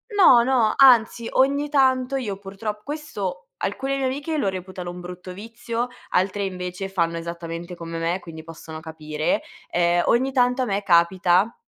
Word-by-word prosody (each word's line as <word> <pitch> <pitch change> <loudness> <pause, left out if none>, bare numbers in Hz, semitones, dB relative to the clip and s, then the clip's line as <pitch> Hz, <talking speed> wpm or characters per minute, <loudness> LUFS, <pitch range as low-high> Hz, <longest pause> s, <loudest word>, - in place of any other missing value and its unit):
no, 260 -12 +7
no, 240 -4 +2
anzi, 235 -3 +5
ogni 280 +3 +2
tanto 260 -2 +2
io 210 -7 -3
purtrop 205 +2 -6
questo 205 - -5
alcune 270 +7 -2
mie 270 - -1
amiche 285 +4 -2
lo 245 - 0
reputano 185 -1 -6
un 180 - -9
brutto 180 +1 -8
vizio, 230 +4 -4 0.2
altre, 195 +2 0
invece, 180 0 -5
fanno 170 -3 0
esattamente 170 +1 -6
come 165 -1 -6
me, 170 +3 -1
quindi 160 -2 -10
possono 160 -1 -9
capire, 155 - -2 0.3
ehm, 175 0 +2
ogni 260 +3 +2
tanto 250 0 +2
a - - -1
me 205 -2 -1
capita 180 +3 +3
195 Hz, 160 wpm, -23 LUFS, 175-250 Hz, 0.3 s, no